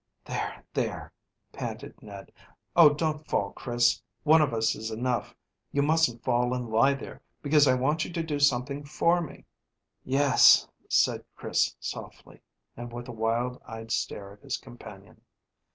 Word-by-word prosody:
"There, - - -5
there!" - - -3 0.4
panted - - -7
Ned. 100 -2 -11 0.4
"Oh, 170 -3 +9
don't 155 0 -2
fall, 100 -1 0
Chris! 120 -2 +1 0.2
One 160 +1 +6
of 150 - +2
us 115 -1 +1
is 110 +1 -5
enough. 120 +2 -2 0.4
You 140 - +1
mustn't 150 -6 +2
fall 125 0 +1
and 120 -3 -5
lie 135 +6 +4
there, 135 - -10 0.2
because 145 0 +4
I 130 - +4
want 150 +5 +1
you - - -6
to 165 -1 -2
do 150 -3 -3
something 140 +1 +1
for 170 +4 +1
me." 160 - -9 0.6
"Yes," 135 0 +5 0.2
said - - +2
Chris - - 0
softly, - - -8 0.3
and 120 0 -8
with 120 +1 -8
a - - -4
wild 115 +2 -1
eyed 115 -1 -9
stare 100 -2 -3
at 105 - -20
his - - -3
companion. - - -13
125 Hz, 155 wpm, -27 LUFS, 115-150 Hz, 0.6 s, Oh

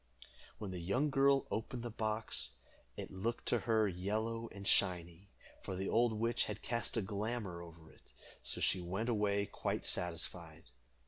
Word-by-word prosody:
When 100 -3 -4
the 90 - -4
young 125 - +1
girl 135 0 +5
opened 115 +2 -2
the 120 - -3
box, 110 0 -1 0.4
it - - -5
looked 110 +6 -2
to 120 - +3
her 110 -1 +5
yellow 110 +5 -1
and 100 -1 -6
shiny, 90 0 +2 0.3
for 95 - -4
the 95 +1 -1
old 115 0 +4
witch 115 +2 +2
had 105 -1 -5
cast 115 -1 -1
a 110 - +2
glamour 100 -2 -2
over 85 -2 -12
it, - - -20 0.3
so - - -3
she 95 - +3
went 95 +7 -1
away 100 -3 +2
quite - - -2
satisfied. 85 -2 -2
105 Hz, 165 wpm, -36 LUFS, 90-115 Hz, 0.4 s, girl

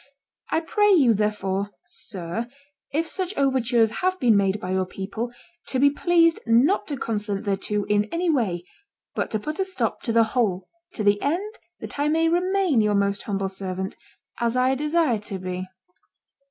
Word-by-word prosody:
I 320 - +1
pray 415 +5 +2
you, 275 -11 +6
therefore, 205 -2 -1 0.2
sir, 195 +3 -5 0.4
if 315 +4 0
such 375 +3 -3
overtures 245 -5 +2
have 370 0 +1
been 235 -4 +4
made 200 0 +2
by 185 -3 -4
your 185 0 0
people, 200 +6 -5 0.4
to 260 - -1
be 280 +2 +5
pleased 330 +2 +3
not 245 - +3
to 285 - -3
consent 210 -4 -2
thereto 205 +1 -1
in 210 0 +2
any 335 +10 -2
way, 210 - 0 0.5
but - - -2
to 215 - -1
put 305 - -5
a - - +3
stop 380 0 -2
to 235 - -2
the 230 0 +5
whole, 195 -7 0 0.3
to 215 - -3
the 205 0 +3
end 385 +9 -2 0.2
that - - -7
I 290 - +2
may 325 +2 +3
remain 360 - +2
your 210 -1 +2
most 200 0 +1
humble 195 -2 -2
servant, 190 0 -4 0.4
as 235 +1 0
I 255 +1 +3
desire 300 -3 +1
to 205 -1 -5
be." 185 0 -5
230 Hz, 175 wpm, -24 LUFS, 200-310 Hz, 0.5 s, you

